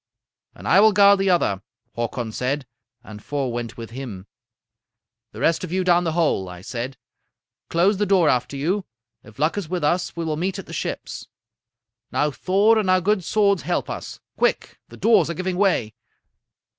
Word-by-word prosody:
"'And - - -9
I - - +6
will 215 +1 +6
guard 200 0 +6
the 195 0 +1
other,' 100 - +2 0.3
Hakon 120 0 -3
said, 130 +4 -2 0.4
and 105 -3 -11
four 140 -4 -2
went 120 -1 -5
with 115 -1 -8
him. 115 -7 -7 1.1
"'The - - -10
rest 165 - +2
of - - -5
you, 185 +1 0
down 175 -1 +3
the 165 - -1
hole!' 155 - +1
I 90 -1 -10
said. 125 +6 -5 0.7
'Close 190 +5 +2
the 205 +1 0
door 185 -4 +4
after 130 +1 0
you. 185 +8 -1 0.4
If 110 0 -16
luck 155 +7 +1
is 175 -6 -7
with 180 -2 -2
us 175 +5 0
we 170 -1 -3
will 155 -1 -2
meet 185 +4 -2
at 195 - -7
the - - -10
ships. - - -5 0.8
Now 150 0 +1
Thor 200 +8 +3
and 200 -3 -1
our 185 0 +5
good 195 +1 +1
swords 200 0 +2
help - - -2
us! - - -7 0.2
Quick! - - 0
The - - -12
doors 210 -8 +4
are 170 - -3
giving 185 +2 -2
way.' 180 - +1
170 Hz, 185 wpm, -22 LUFS, 125-195 Hz, 1.1 s, I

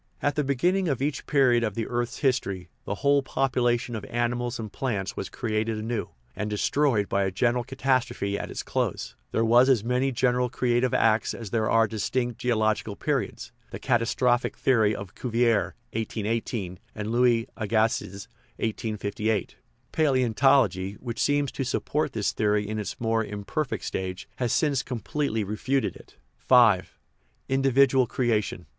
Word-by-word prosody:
At 145 - +1
the 150 - 0
beginning 175 +8 +1
of 140 -6 0
each 140 +2 -2
period 125 -4 +4
of 105 -3 -2
the 115 - -2
earth's 120 0 -2
history 100 - -1 0.2
the - - -2
whole 140 0 +5
population 120 -3 0
of 105 - -5
animals 120 0 -1
and 110 -3 -7
plants 100 -7 -2
was 95 - -4
created 110 -1 -2
anew, 110 0 -3 0.3
and 105 +1 -3
destroyed 110 0 +1
by 100 0 +1
a 95 - +1
general 120 +5 +1
catastrophe 130 -6 -1
at - - -4
its - - -5
close; - - -2 0.2
there 115 - +1
were 120 +2 +6
as 130 -5 +3
many 125 +3 +1
general 125 0 +1
creative 120 +1 +1
acts 110 0 +2
as 110 -4 -8
there 110 -2 +1
are 115 -1 +4
distinct 120 +2 -2
geolog 110 -3 +2
ical 105 -3 -8
periods - - -2 0.2
(the - - -6
catastrophic 120 0 +1
theory 110 -5 +3
of 100 -2 -8
Cuvier 115 -6 +1 0.2
and 110 -2 -3
Louis 120 -1 +3
Agassiz 110 -2 -1 0.2
). - - -35
Palaeontology, 110 - 0
which 120 -2 -6
seemed 145 -1 +1
to 135 - -2
support 140 +3 -1
this 110 -3 0
theory 105 -1 +1
in 110 +1 -3
its 100 -4 -5
more 115 -1 +1
imperfect 110 - -3
stage, 95 0 -4
has 120 -3 -1
since 145 -5 +2
completely 125 -1 -2
refuted 125 +7 -1
it. - - -16 0.3
V. 115 -7 +7 0.7
Individual 135 -1 +3
creation. 115 -5 -1
115 Hz, 150 wpm, -26 LUFS, 110-130 Hz, 0.7 s, V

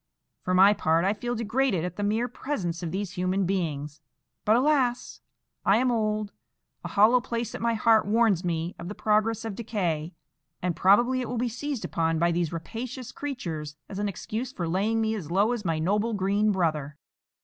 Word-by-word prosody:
For 185 - 0
my 195 +3 +7
part, 165 -3 +1
I 195 - +3
feel 240 +3 -3
degraded 225 -5 0
at 180 -1 -5
the - - -4
mere 220 +4 +1
presence 195 - -4
of 170 - -3
these 195 0 -3
human 185 +1 0
beings; 155 -5 -2 0.4
but, 215 - +5
alas! 255 -2 +1 0.4
I 200 - +4
am 250 +1 +2
old; 215 -2 -1 0.5
a - - -4
hollow 225 +5 +5
place 235 -1 -3
at - - -6
my 230 0 +1
heart 220 -1 +4
warns 215 -4 +3
me 170 0 -2
of 170 - -6
the 205 - -6
progress 220 +1 +1
of 220 - -3
decay, 180 -8 -2 0.4
and 180 -2 -1
probably 240 +7 +4
it 250 - -4
will 245 - -3
be 245 +1 0
seized 270 +1 -4
upon 165 -1 0
by 170 +2 +2
these 170 -2 0
rapacious 235 +9 -6
creatures 165 - -5
as 200 - -6
an 205 0 0
excuse 225 +6 -4
for 180 -10 -4
laying 205 +6 +1
me 220 0 +1
as 185 -9 -5
low 200 +6 +2
as 240 -4 -2
my 165 -4 0
noble 205 +8 0
green 200 +2 +2
brother." 155 -6 -1
205 Hz, 195 wpm, -27 LUFS, 175-230 Hz, 0.5 s, my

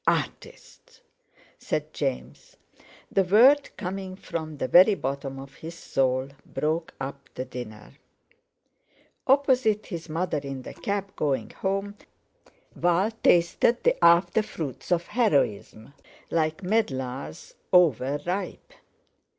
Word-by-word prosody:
"Artists!" - - -3 0.6
said - - -3
James. 65 0 -4 0.5
The 195 - +3
word 250 +10 +5
coming 190 0 -5
from 160 -5 -6
the 130 - -2
very 185 +7 +7
bottom 135 -3 -4
of 135 0 -10
his 165 +1 -8
soul, 130 -3 0
broke 160 +2 -2
up 135 0 -7
the 130 - -4
dinner. 115 -4 -9 1.3
Opposite 260 -6 +3
his 170 -4 -7
mother 165 -1 -1
in 135 -2 -6
the - - -8
cab 200 -1 -3
going 135 -7 -1
home, 195 +1 -3 0.8
Val 175 +5 +2
tasted 175 +7 +3
the - - +2
after 170 +5 +5
fruits 160 - -6
of 170 -1 +2
heroism, 140 - 0 0.4
like 160 +2 0
medlars 140 - -2 0.2
over 145 -6 +4
ripe. 195 - -4
170 Hz, 110 wpm, -26 LUFS, 135-195 Hz, 1.3 s, very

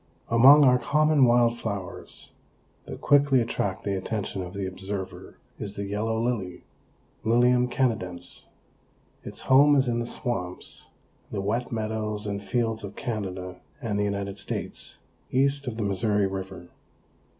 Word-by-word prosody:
Among 135 +6 +8
our 125 -2 +5
common 150 +2 +4
wild 120 -1 +3
flowers, 100 -5 -5 0.5
that - - -8
quickly 140 -2 +4
attract 100 -4 -2
the 100 - -1
attention 95 0 -3
of 90 +1 -7
the 100 -1 -2
observer 95 +1 -5 0.2
is 100 0 -5
the 100 - -3
Yellow 110 +3 -1
Lily 110 -7 -2 0.6
(Lilium 125 +2 +3
canadense). 90 -9 -2 0.8
Its - - -7
home 145 +2 +6
is 135 -2 +3
in 120 -1 0
the 120 - -2
swamps, 90 -8 -3 0.4
the - - -3
wet 110 +5 -1
meadows 110 -1 -2
and 100 -1 -3
fields 115 0 -1
of 100 0 -7
Canada 95 -7 -4 0.2
and 110 -7 -2
the - - +2
United 100 0 -3
States, - - -5 0.3
east 140 +1 +1
of 115 -3 -3
the 115 - -1
Missouri 100 +1 +1
river. 95 -2 -6
110 Hz, 140 wpm, -26 LUFS, 100-125 Hz, 0.8 s, Among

